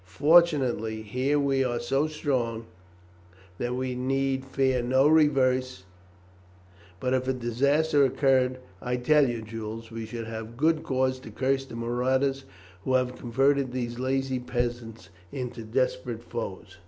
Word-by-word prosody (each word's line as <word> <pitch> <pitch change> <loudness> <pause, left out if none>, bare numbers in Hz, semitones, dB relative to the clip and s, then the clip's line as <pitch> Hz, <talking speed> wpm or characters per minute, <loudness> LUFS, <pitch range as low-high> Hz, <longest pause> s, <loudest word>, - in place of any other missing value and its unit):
Fortunately, 130 - +3
here 130 +7 0
we 135 -1 +2
are 120 -2 -1
so 135 +5 0
strong 125 -7 -2 0.9
that 120 +1 -2
we 130 0 -2
need 135 +1 -1
fear 130 -1 +1
no 130 +3 +3
reverse, 130 -7 +2 1.2
but 130 0 -1
if 130 0 0
a 130 - +2
disaster 140 +5 +2
occurred 130 -1 +2 0.2
I 125 0 -1
tell 140 +2 +4
you, 115 -2 -4
Jules, 110 +1 -7
we 115 -1 -6
should 115 -1 -6
have 115 +1 -7
good 155 +3 +2
cause 130 -1 0
to 120 - -11
curse 135 +4 0
the 115 - -10
marauders 130 +3 0 0.4
who 130 - +1
have 125 0 +1
converted 135 +2 +1
these 120 -1 -4
lazy 130 0 -1
peasants 120 -5 -4 0.2
into 125 -3 -5
desperate 115 0 -2
foes." 95 -5 -7
130 Hz, 140 wpm, -27 LUFS, 120-135 Hz, 1.2 s, tell